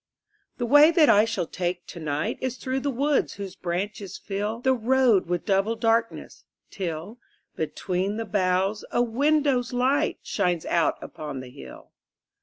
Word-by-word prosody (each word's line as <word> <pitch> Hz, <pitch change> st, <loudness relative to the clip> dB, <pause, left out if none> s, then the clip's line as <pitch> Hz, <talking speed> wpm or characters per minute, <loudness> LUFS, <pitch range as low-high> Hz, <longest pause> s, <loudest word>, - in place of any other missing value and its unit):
The 240 Hz, -, -2 dB
way 290 Hz, +5 st, +7 dB
that 325 Hz, -3 st, +4 dB
I 210 Hz, +1 st, +6 dB
shall 225 Hz, -6 st, -2 dB
take 175 Hz, +1 st, -3 dB
to 170 Hz, -, -10 dB
night 150 Hz, -2 st, -2 dB
Is 260 Hz, -1 st, -3 dB
through 260 Hz, +3 st, -2 dB
the 285 Hz, -, -2 dB
wood 280 Hz, +3 st, +1 dB
whose 195 Hz, -2 st, -7 dB
branches 190 Hz, +2 st, -4 dB
fill 210 Hz, +3 st, -4 dB
The 265 Hz, +1 st, +3 dB
road 240 Hz, -5 st, +3 dB
with 175 Hz, -1 st, -2 dB
double 200 Hz, +3 st, +1 dB
darkness, 230 Hz, 0 st, -1 dB, 0.3 s
till, 185 Hz, +4 st, -5 dB, 0.4 s
Between 185 Hz, +5 st, -2 dB
the 225 Hz, -, -3 dB
boughs, 190 Hz, 0 st, 0 dB
a 240 Hz, -, +2 dB
window's 270 Hz, 0 st, +1 dB
light 255 Hz, +3 st, +1 dB
Shines 175 Hz, -3 st, -1 dB
out 170 Hz, -2 st, +1 dB
upon 150 Hz, -3 st, -7 dB
the 130 Hz, -1 st, -9 dB
hill. 65 Hz, -, -12 dB
210 Hz, 155 wpm, -25 LUFS, 180-250 Hz, 0.4 s, way